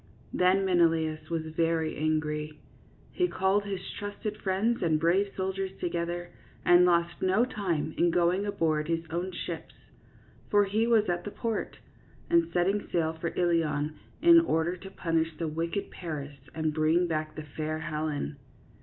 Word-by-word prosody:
Then 185 +2 +3
Menelaus 160 -3 +2
was 165 -1 -1
very 165 -1 +1
angry. 150 0 -1 0.5
He 360 - +1
called 195 - +1
his 195 -2 -4
trusted 205 +1 -5
friends 205 +5 +1
and 160 -3 +2
brave 185 +5 +2
soldiers 190 0 -2
together 175 0 -3 0.3
and 175 0 +7
lost 170 -1 +2
no 190 +6 +3
time 175 -10 -2
in 175 - +4
going 175 +3 +2
aboard 160 -6 0
his 165 0 -1
own 175 +3 -2
ships 175 - -6 0.4
— - - -28
for 205 0 +5
he 215 +4 +1
was 225 -3 +4
at 175 -1 -1
the - - -4
port 225 +1 -3 0.3
— - - -28
and 340 -1 +3
setting 195 +4 +1
sail 160 -2 +1
for 165 +1 -4
Ilion, 160 -4 +1 0.3
in 340 0 +9
order 170 - +1
to 190 +2 -10
punish 165 -4 -1
the 165 - -2
wicked 165 +5 -3
Paris 150 -5 -6 0.2
and 155 -1 0
bring 160 +3 +3
back 155 -2 -2
the 155 - -6
fair 155 +1 -4
Helen. 155 -2 -3
170 Hz, 160 wpm, -29 LUFS, 155-190 Hz, 0.5 s, in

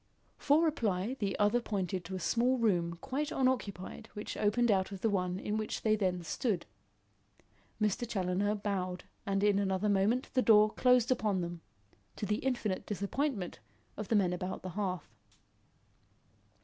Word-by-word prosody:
For 300 +3 +4
reply, 225 - 0
the 200 -2 -1
other 210 +4 +3
pointed 190 -5 -2
to 190 +2 -5
a - - -3
small 245 +7 +2
room 175 -7 +1
quite 295 +3 -2
unoccupied 225 -5 -1
which 210 - -5
opened 220 +3 +2
out 190 0 +1
of 195 -2 -7
the 225 - +2
one 180 -2 0
in 210 +2 -2
which 215 0 -3
they 215 -1 +4
then 185 -4 -1
stood. 195 - -1 1.1
Mr. 215 +2 0
Challoner 195 0 0
bowed 190 -3 -3 0.2
and 195 0 +1
in 205 -1 +4
an 195 -1 0
other 190 +2 +1
moment 205 +6 +2
the 255 - +3
door 215 -2 +6
closed 250 -1 +4
upon 210 -6 +1
them, 170 -1 -5 0.5
to - - -3
the 210 +1 0
infinite 235 -7 -2
disappointment 205 - -2 0.4
of 210 - -5
the 225 - +1
men 185 -4 +3
about 180 +1 -4
the 185 - -4
hearth. 185 - -3
205 Hz, 160 wpm, -32 LUFS, 185-230 Hz, 1.1 s, door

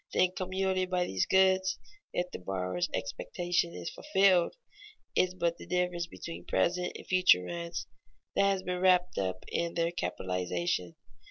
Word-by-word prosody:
The - - -3
income 185 0 0
yielded 190 -1 0
by 180 -1 +1
these 95 - 0
goods, 190 0 +4 0.3
if 180 0 -2
the - - -6
borrower's 95 - -2
expectation 175 +9 -1
is - - -5
fulfilled, 195 - +3 0.6
is 185 0 +2
but 170 -1 0
the - - -11
difference 180 -1 0
between 165 0 -8
present 180 +1 +1
and - - -11
future 185 - +5
rents 170 - -4 0.5
that - - +4
has 195 -1 0
been 180 0 -2
wrapped 180 - +4
up 95 -1 -2
in 170 0 -1
their 170 0 +1
capitalization. 90 - -2
175 Hz, 155 wpm, -31 LUFS, 115-185 Hz, 0.6 s, future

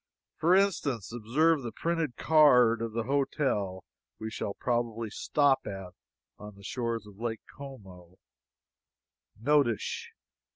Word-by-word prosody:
For 175 +3 +4
instance, 145 - 0
observe 140 +7 +2
the 120 -3 -5
printed 165 0 -2
card 125 -7 +5
of 115 -1 -3
the 115 0 -1
hotel 130 - -1 0.4
we 110 0 -5
shall 100 -2 -4
probably 115 -2 -2
stop 140 +3 +2
at 95 -3 -7 0.5
on 105 -1 -10
the 100 - -16
shores 115 -1 -3
of 105 -1 -15
Lake 115 -2 -3
Como: 95 -10 -11 1.2
"NOTISH." 135 -2 +1
120 Hz, 120 wpm, -29 LUFS, 105-140 Hz, 1.2 s, card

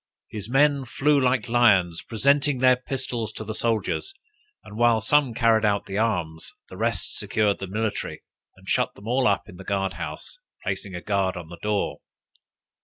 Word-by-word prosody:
His 105 0 -6
men 140 +1 +3
flew 140 +3 +2
like 125 -3 +1
lions, 100 -8 +3
presented 140 +3 +1
their 130 0 +6
pistols 125 -4 -4
to - - -6
the 110 +1 -5
soldiers, 115 - -1 0.5
and 105 - -11
while 120 0 +4
some 130 +2 +2
carried 115 -2 +3
out 100 -1 +1
the 95 +1 -3
arms, 85 -8 -2 0.2
the - - -10
rest - - -2
secured 105 -2 +1
the 95 - -5
military, 105 +2 -3 0.3
and - - -19
shut - - +1
them 100 - -12
all 125 +2 +2
up 100 - +1
in 90 - -12
the 95 - -9
guard 95 -1 -1
house, - - -7 0.2
placing 95 -3 -4
a 90 - -5
guard 100 -2 0
on 85 -2 -8
the 85 0 -10
door. 105 -1 -1
110 Hz, 180 wpm, -25 LUFS, 100-125 Hz, 0.5 s, their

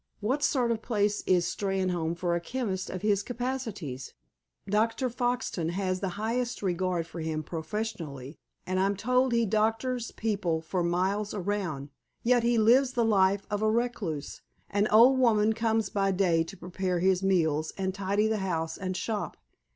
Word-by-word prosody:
What 255 +8 0
sort 250 -5 +2
of 225 -1 -1
place 210 -3 0
is 180 -2 +3
Steynholme 180 -4 -1
for 175 0 0
a 170 - 0
chemist 195 -3 -3
of 185 +1 -5
his 205 -2 +2
capacities? 225 - -4 0.5
Dr. 225 +5 +1
Foxton 245 -9 -1
has 185 -1 -1
the 190 -1 -4
highest 235 +2 -2
regard 180 -2 0
for 165 +1 -9
him 160 -1 -2
professionally, 160 - -5 0.3
and 185 0 -1
I'm 195 +1 +2
told 250 +4 +2
he 235 -1 +3
doctors 225 +4 0
people 200 -7 -1
for 170 +3 -2
miles 190 +5 0
around. 180 -8 -2 0.3
Yet 245 0 +4
he 235 0 +2
lives 250 +4 +4
the 240 -3 +2
life 195 -2 +3
of 205 0 -1
a 215 - +3
recluse. 215 -10 -2 0.3
An 205 +1 +2
old 240 +5 +6
woman 220 -3 +4
comes 220 -2 0
by 195 -1 +1
day 180 -4 +2
to - - -10
prepare 180 +1 -2
his 185 +1 +2
meals, 160 -5 +1
and 190 -1 -1
tidy 200 +2 +1
the 220 0 0
house 165 -5 -2
and 185 -1 -3
shop. 215 +2 -3
200 Hz, 165 wpm, -28 LUFS, 180-225 Hz, 0.5 s, old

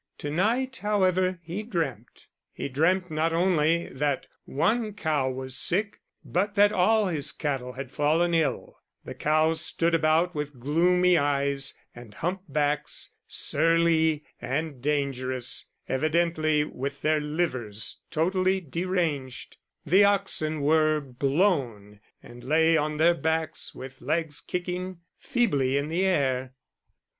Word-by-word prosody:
To 145 - -5
night, 240 - 0
however, 185 -4 +1
he 175 +5 -4
dreamt. 160 - -4 0.3
He - - -5
dreamt 175 +6 +1
not 160 +2 0
only 170 -1 +2
that 145 -2 -1 0.2
one 215 - 0
cow 155 -9 0
was 130 0 -5
sick, 200 +8 +2 0.3
but 200 +3 -1
that 205 0 +5
all 215 +4 +3
his 155 -5 0
cattle 135 -4 -3
had 130 0 -7
fallen 160 +4 +1
ill 160 -6 -1 0.3
the - - -6
cows 155 +1 +1
stood 170 0 +1
about 165 +2 +2
with 150 -3 -5
gloomy 175 +6 +3
eyes 140 -1 0 0.2
and 120 -4 -13
humpbacks, 150 - -2 0.2
surly 160 -1 +2 0.2
and 140 -1 -3
dangerous, 130 -3 -1 0.2
evidently 155 +1 +1
with 140 -1 -6
their 155 0 +2
livers 150 -9 -3
totally 185 +4 +1
deranged; 165 -5 -3 0.3
the 190 +6 +5
oxen 195 -7 +1
were 155 +1 +3
"blown," 135 - -1 0.2
and 120 +1 -13
lay 160 +3 +3
on 150 0 0
their 165 +2 +5
backs 160 0 -2
with 130 0 -10
legs 155 +1 -2
kicking 180 0 -4 0.2
feebly 140 - +1
in 140 +2 -2
the 170 +4 0
air. 130 -7 0
155 Hz, 125 wpm, -26 LUFS, 140-180 Hz, 0.3 s, that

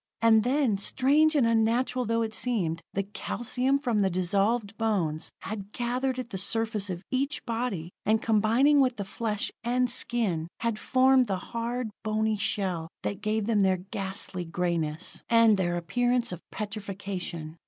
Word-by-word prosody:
And 220 -1 +5
then, 250 -5 +1
strange 295 +8 +3
and 275 -5 +4
unnatural 230 +3 +2
though 230 +1 +1
it 220 -1 -4
seemed, 180 -10 -1
the 200 - +1
calcium 250 +6 -1
from 245 -6 0
the 195 -1 +3
dissolved 200 +4 0
bones 190 -9 -1
had 205 -1 -6
gathered 250 +2 -1
at 245 -2 -5
the 190 - -3
surface 220 0 0
of 180 0 -5
each 275 +3 -1
body, 225 -8 -3
and 220 +1 +3
combining 230 +7 +4
with 255 -2 +2
the 200 - -3
flesh 210 +1 -3
and 245 +1 +1
skin, 210 -10 -1
had 230 -2 -1
formed 260 -1 +4
the 195 -2 -1 0.2
hard, 235 0 -2
bony 220 0 +1
shell 195 -6 -2 0.2
that 200 0 -3
gave 215 0 0
them 220 -2 +2
their 190 -1 +3
ghastly 190 0 -4
grayness, 165 -2 -2
and 230 -2 +6
their 175 -2 0
appearance 245 +7 +1
of 175 -1 -6
petrification. 195 -6 -5
220 Hz, 155 wpm, -28 LUFS, 195-245 Hz, 0.2 s, and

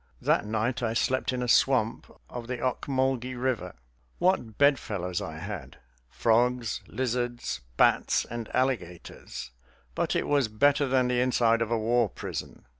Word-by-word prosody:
That 105 - +1
night 110 +4 -1
I 115 -1 -1
slept 130 +2 +1
in 125 -1 -2
a - - -2
swamp 120 -2 +2 0.2
of 120 -1 -7
the 125 0 -3
Ocmulgee 130 0 -1
River. 120 - -2 0.4
What 125 - +1
bedfellows 105 -11 +1
I 80 0 -6
had! 90 -5 -7 0.3
frogs, 120 - +1
lizards, 120 -1 -2 0.2
bats, - - +3
and 115 -1 -6
alligators. 115 - -3 0.4
But - - -1
it - - +1
was 140 -4 +2
better 140 +6 +2
than 130 -1 +2
the 125 0 +1
inside 120 -2 +3
of 115 - 0
a 115 - +1
war 115 0 +2
prison. - - -7
120 Hz, 145 wpm, -28 LUFS, 110-130 Hz, 0.4 s, bats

